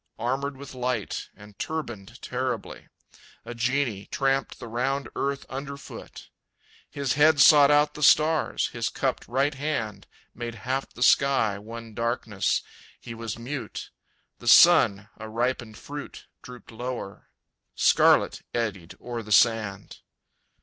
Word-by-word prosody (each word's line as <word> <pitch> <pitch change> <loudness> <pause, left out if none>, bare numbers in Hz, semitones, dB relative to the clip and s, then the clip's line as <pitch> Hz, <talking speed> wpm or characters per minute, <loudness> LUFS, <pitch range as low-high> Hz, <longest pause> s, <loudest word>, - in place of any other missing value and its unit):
Armored 135 +4 -2
with 140 0 -10
light, 125 -4 -3
and 105 0 -16
turbaned 120 -8 -5
terribly, 125 -3 -4 0.6
A - - -6
genie 120 -3 -1
tramped 135 0 -1
the 120 - -9
round 135 +4 -2
earth 140 0 -2
underfoot; 140 +1 -9 0.6
His 140 -3 -2
head 150 0 +4
sought 145 +1 +8
out 150 0 +4
the 150 - -9
stars, 155 +2 +3
his - - -2
cupped - - -2
right 135 +4 +1
hand 135 -8 -4 0.3
Made 120 0 -6
half 135 +2 -2
the 125 - -3
sky 120 -9 +3
one 115 +1 -9
darkness. 115 -3 -1 0.4
He 115 - -9
was 115 -1 -6
mute. 125 +2 -6 0.5
The - - -10
sun, 110 - +6
a 110 0 -8
ripened 120 -1 -2
fruit, 145 0 -9 0.2
Drooped 125 -1 -12
lower. 120 -3 -6 0.5
Scarlet - - +4
eddied 100 -7 -3
o'er 120 -1 -5
the 105 -1 -10
sand. 110 -1 +2
125 Hz, 130 wpm, -26 LUFS, 115-140 Hz, 0.6 s, sought